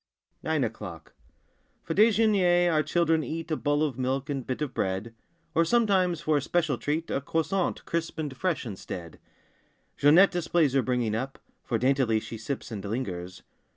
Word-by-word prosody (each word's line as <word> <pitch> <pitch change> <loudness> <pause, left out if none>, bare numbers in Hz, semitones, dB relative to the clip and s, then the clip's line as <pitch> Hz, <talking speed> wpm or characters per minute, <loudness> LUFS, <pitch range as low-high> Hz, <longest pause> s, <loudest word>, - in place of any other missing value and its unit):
9 160 -1 0
NINE - - +3
O'CLOCK 85 -7 -10 0.7
F - - -26
or - - +2
dejemier 200 -4 +4
our 155 -1 +3
children 160 +1 +1
eat 165 +2 -5
A - - +2
bowl 145 0 +1
of 135 -5 -2
milk 130 +2 -1
and 135 -3 -4
bit 130 - -2
of 140 - -4
bread; 95 +4 -2 0.4
Or 165 - +4
sometimes, 185 -4 +2
for 155 -1 +2
a - - 0
special 155 -3 0
treat, 155 +3 -2
A 135 - 0
croissant, 165 +6 -1
crisp 165 0 -3
and 150 -4 -4
fresh, 175 -2 -1
instead. 90 -5 -7 0.8
Jeanette 160 +8 +6
displays 170 -5 +1
her 135 - +4
bringing 125 -4 0
up. 130 +5 -3 0.3
For 115 - -1
daintily 125 -2 +2
she 115 +1 -8
sips 125 +2 -5
and 105 -3 -5
lingers. 95 -5 -4
145 Hz, 175 wpm, -27 LUFS, 120-170 Hz, 0.8 s, Jeanette